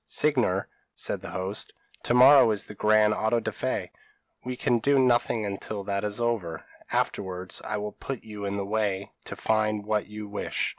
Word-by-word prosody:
"Signor," 125 Hz, -11 st, +1 dB, 0.3 s
said -, -, -2 dB
the -, -, -7 dB
host, 95 Hz, +3 st, -2 dB, 0.3 s
"to 120 Hz, -, 0 dB
morrow 130 Hz, 0 st, +8 dB
is 105 Hz, -2 st, 0 dB
the -, -, -9 dB
grand 105 Hz, +1 st, +4 dB
auto 110 Hz, +2 st, +1 dB
da -, -, -3 dB
fe; -, -, -3 dB, 0.5 s
we 125 Hz, 0 st, -4 dB
can 125 Hz, -2 st, +1 dB
do 140 Hz, +5 st, +3 dB
nothing 120 Hz, -3 st, +2 dB
until 100 Hz, +1 st, -4 dB
that 100 Hz, 0 st, -2 dB
is 105 Hz, +1 st, -1 dB
over; 105 Hz, -9 st, -2 dB, 0.3 s
afterwards, 90 Hz, -2 st, -1 dB
I 105 Hz, -, -2 dB
will 105 Hz, 0 st, -4 dB
put 135 Hz, -3 st, -6 dB
you 105 Hz, -2 st, -8 dB
in 100 Hz, 0 st, -2 dB
the 100 Hz, -, -2 dB
way 100 Hz, -2 st, -1 dB
to -, -, -5 dB
find 105 Hz, -1 st, +1 dB
out 100 Hz, -, -16 dB
what 110 Hz, -1 st, 0 dB
you 105 Hz, 0 st, -7 dB
wish. 100 Hz, 0 st, -2 dB
105 Hz, 190 wpm, -27 LUFS, 100-120 Hz, 0.5 s, morrow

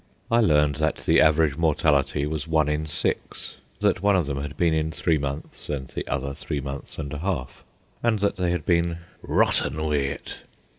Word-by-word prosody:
I 115 Hz, -, +5 dB
learned 75 Hz, -8 st, +3 dB
that 80 Hz, 0 st, +1 dB
the -, -, +5 dB
average 75 Hz, -2 st, +4 dB
mortality 75 Hz, -3 st, +2 dB
was 75 Hz, +1 st, -3 dB
one 80 Hz, -2 st, +2 dB
in 75 Hz, +1 st, -1 dB
six, 75 Hz, -, -3 dB, 0.2 s
that -, -, +2 dB
one 100 Hz, 0 st, +4 dB
of 90 Hz, -4 st, +2 dB
them 70 Hz, -1 st, -3 dB
had 75 Hz, +1 st, -6 dB
been 85 Hz, -2 st, +3 dB
in 80 Hz, 0 st, 0 dB
three 80 Hz, 0 st, +1 dB
months 70 Hz, +2 st, -6 dB
and 65 Hz, -3 st, -3 dB
the -, -, -5 dB
other 70 Hz, +1 st, -2 dB
three 75 Hz, 0 st, -4 dB
months 70 Hz, 0 st, -5 dB
and 70 Hz, -2 st, -5 dB
a 75 Hz, -, -4 dB
half, 80 Hz, -8 st, -3 dB, 0.4 s
and 115 Hz, -2 st, +2 dB
that 100 Hz, 0 st, 0 dB
they 90 Hz, -1 st, 0 dB
had 85 Hz, -3 st, -1 dB
been 85 Hz, -1 st, +2 dB, 0.2 s
"rotten 75 Hz, +1 st, +2 dB
wi' 80 Hz, -1 st, 0 dB
it." 70 Hz, 0 st, -3 dB
75 Hz, 195 wpm, -25 LUFS, 70-85 Hz, 0.4 s, I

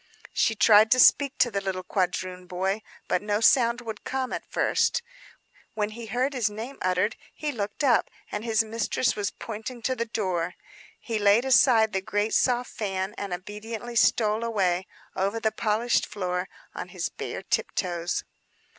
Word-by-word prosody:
She 225 Hz, -, +2 dB
tried 215 Hz, 0 st, +6 dB
to 255 Hz, -, +1 dB
speak 280 Hz, +2 st, +5 dB
to 245 Hz, -1 st, +3 dB
the 200 Hz, -1 st, -1 dB
little 190 Hz, -1 st, -3 dB
quadroon 185 Hz, -1 st, -2 dB
boy; 190 Hz, +4 st, -1 dB, 0.3 s
but 180 Hz, -, +1 dB
no 205 Hz, 0 st, 0 dB
sound 235 Hz, +1 st, +4 dB
would 220 Hz, -3 st, -7 dB
come, 260 Hz, -1 st, -2 dB
at -, -, -6 dB
first. 480 Hz, -, +1 dB, 0.7 s
When 210 Hz, -1 st, -1 dB
he 230 Hz, +1 st, -8 dB
heard 250 Hz, +6 st, 0 dB
his 240 Hz, -5 st, +1 dB
name 225 Hz, +6 st, -7 dB
uttered, 185 Hz, +4 st, +1 dB, 0.2 s
he 300 Hz, -1 st, -3 dB
looked 210 Hz, +1 st, -4 dB
up, 250 Hz, -5 st, +3 dB, 0.2 s
and 210 Hz, -, -3 dB
his 225 Hz, -1 st, +2 dB
mistress 230 Hz, +2 st, 0 dB
was 205 Hz, -1 st, -1 dB
pointing 225 Hz, +3 st, -7 dB
to 260 Hz, +3 st, 0 dB
the 235 Hz, -1 st, -2 dB
door. 185 Hz, -6 st, -2 dB, 0.4 s
He 225 Hz, -2 st, -3 dB
laid 205 Hz, +4 st, +4 dB
aside 230 Hz, -3 st, +5 dB
the 190 Hz, -, 0 dB
great, 205 Hz, +1 st, -1 dB
soft 250 Hz, -1 st, +2 dB
fan, 195 Hz, -2 st, -3 dB
and 200 Hz, -2 st, -4 dB
obediently 215 Hz, +6 st, -6 dB
stole 220 Hz, -1 st, +3 dB
away, 190 Hz, -5 st, 0 dB, 0.3 s
over 200 Hz, +4 st, 0 dB
the 220 Hz, -1 st, +1 dB
polished 225 Hz, +3 st, +1 dB
floor, 180 Hz, -2 st, -3 dB, 0.2 s
on -, -, -6 dB
his -, -, -3 dB
bare -, -, -6 dB
tiptoes. 175 Hz, -2 st, -1 dB
215 Hz, 165 wpm, -26 LUFS, 195-235 Hz, 0.7 s, tried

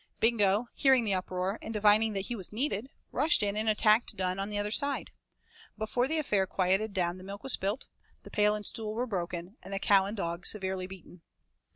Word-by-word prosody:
Bingo, 220 Hz, -1 st, +3 dB
hearing 265 Hz, -3 st, +4 dB
the 205 Hz, -3 st, 0 dB
uproar, 185 Hz, +2 st, -2 dB
and -, -, -6 dB
divining 215 Hz, +1 st, +4 dB
that 195 Hz, -1 st, -3 dB
he 240 Hz, -, -3 dB
was 190 Hz, -5 st, -4 dB
needed, 235 Hz, 0 st, -2 dB, 0.2 s
rushed 310 Hz, -8 st, +3 dB
in 200 Hz, 0 st, 0 dB
and 215 Hz, +1 st, +1 dB
attacked 215 Hz, +2 st, +3 dB
Dunne 185 Hz, 0 st, -2 dB
on 195 Hz, +1 st, -2 dB
the 210 Hz, -, -3 dB
other 205 Hz, 0 st, -1 dB
side. 280 Hz, +4 st, -1 dB, 0.7 s
Before 230 Hz, +4 st, 0 dB
the 320 Hz, +3 st, -1 dB
affair 205 Hz, -11 st, +1 dB
quieted 190 Hz, +4 st, +1 dB
down 180 Hz, -1 st, -1 dB
the -, -, -11 dB
milk 200 Hz, +1 st, -8 dB
was 270 Hz, -, +4 dB
spilt, 200 Hz, +7 st, -1 dB, 0.4 s
the -, -, -12 dB
pail 210 Hz, 0 st, +3 dB
and 210 Hz, -1 st, -6 dB
stool 215 Hz, 0 st, -5 dB
were 245 Hz, +2 st, 0 dB
broken, 180 Hz, -1 st, -4 dB
and 195 Hz, -, -11 dB
the 195 Hz, -, -1 dB
cow 195 Hz, 0 st, +4 dB
and 205 Hz, +3 st, -5 dB
the -, -, -2 dB
dog 170 Hz, +1 st, -3 dB
severely 190 Hz, -2 st, -1 dB
beaten. 185 Hz, -2 st, -13 dB
205 Hz, 215 wpm, -30 LUFS, 190-220 Hz, 0.7 s, hearing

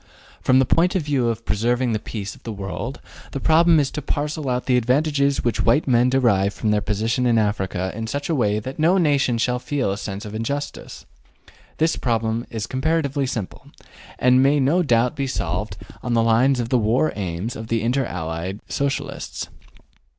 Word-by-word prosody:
From 130 Hz, -, +4 dB
the 130 Hz, -, +4 dB
point 175 Hz, +8 st, +2 dB
of 185 Hz, -, +1 dB
view 140 Hz, -5 st, 0 dB
of 115 Hz, 0 st, -4 dB
preserving 120 Hz, +3 st, +1 dB
the 110 Hz, -, 0 dB
peace 100 Hz, -2 st, -6 dB
of -, -, -17 dB
the 115 Hz, -, -6 dB
world, 105 Hz, +6 st, -5 dB, 0.3 s
the 140 Hz, -, -2 dB
problem 160 Hz, +2 st, +5 dB
is 140 Hz, -2 st, 0 dB
to 150 Hz, -, -4 dB
parcel 145 Hz, 0 st, -2 dB
out 125 Hz, 0 st, -1 dB
the 130 Hz, -, +2 dB
advantages 140 Hz, +3 st, +1 dB
which 120 Hz, -3 st, 0 dB
white 145 Hz, -, +3 dB
men 125 Hz, -1 st, +4 dB
derive 105 Hz, -7 st, +2 dB
from 110 Hz, -, 0 dB
their 105 Hz, 0 st, +2 dB
position 110 Hz, +5 st, 0 dB
in 115 Hz, -1 st, +3 dB
Africa 95 Hz, -3 st, -1 dB
in 110 Hz, +1 st, -5 dB
such 140 Hz, +4 st, -3 dB
a 165 Hz, -, 0 dB
way 105 Hz, -7 st, +1 dB
that 130 Hz, +7 st, -6 dB
no 170 Hz, +5 st, +4 dB
nation 140 Hz, -8 st, +2 dB
shall 125 Hz, +2 st, 0 dB
feel 130 Hz, -5 st, -1 dB
a 100 Hz, -, -3 dB
sense 100 Hz, 0 st, -5 dB
of 105 Hz, -, -7 dB
injustice. 140 Hz, +7 st, -5 dB, 0.7 s
This 160 Hz, +1 st, +1 dB
problem 115 Hz, -1 st, -1 dB
is 110 Hz, -3 st, -4 dB
comparatively 140 Hz, +1 st, 0 dB
simple, 110 Hz, -6 st, -5 dB, 0.5 s
and 125 Hz, +1 st, +4 dB
might 140 Hz, +1 st, +3 dB
no 160 Hz, +7 st, +3 dB
doubt 120 Hz, -5 st, +2 dB
be 140 Hz, 0 st, -2 dB
solved 95 Hz, -3 st, -3 dB, 0.2 s
on 120 Hz, -1 st, -1 dB
the 115 Hz, -, +3 dB
lines 125 Hz, +4 st, +3 dB
of 120 Hz, -1 st, -2 dB
the 125 Hz, -, +3 dB
war 115 Hz, +8 st, +1 dB
aims 95 Hz, +3 st, -4 dB
of 110 Hz, -, -7 dB
the 115 Hz, -1 st, 0 dB
Inter 125 Hz, +3 st, +1 dB
Allied 85 Hz, +2 st, -4 dB
Socialists. 140 Hz, 0 st, -3 dB
125 Hz, 195 wpm, -22 LUFS, 110-140 Hz, 0.7 s, problem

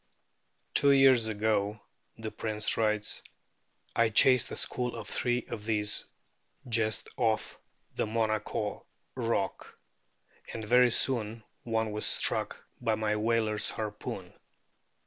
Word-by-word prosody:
* -, -, -39 dB
"Two 140 Hz, -, +4 dB
years 135 Hz, -4 st, +5 dB
ago," 105 Hz, -1 st, 0 dB, 0.4 s
the 110 Hz, -1 st, -5 dB
Prince 110 Hz, -1 st, 0 dB
writes, 105 Hz, -1 st, 0 dB, 0.4 s
" -, -, -37 dB
I 115 Hz, -1 st, +3 dB
chased 125 Hz, +3 st, +5 dB
a -, -, -4 dB
school 125 Hz, -1 st, -3 dB
of 115 Hz, -2 st, -7 dB
three 120 Hz, +1 st, -1 dB
of 105 Hz, -, -6 dB
these 105 Hz, -1 st, +1 dB, 0.6 s
just 115 Hz, -2 st, 0 dB
off 115 Hz, -3 st, -1 dB, 0.3 s
the -, -, -2 dB
Monaco 110 Hz, -1 st, -2 dB, 0.3 s
rock, -, -, -3 dB, 0.8 s
and 110 Hz, -1 st, -5 dB
very 125 Hz, +3 st, +5 dB
soon 115 Hz, -2 st, +2 dB, 0.2 s
one 110 Hz, -2 st, -1 dB
was 105 Hz, 0 st, 0 dB
struck -, -, +1 dB, 0.2 s
by 115 Hz, -2 st, +1 dB
my 105 Hz, 0 st, -1 dB
whaler's 110 Hz, -1 st, 0 dB
harpoon. 105 Hz, -1 st, -6 dB
110 Hz, 125 wpm, -29 LUFS, 105-115 Hz, 0.8 s, years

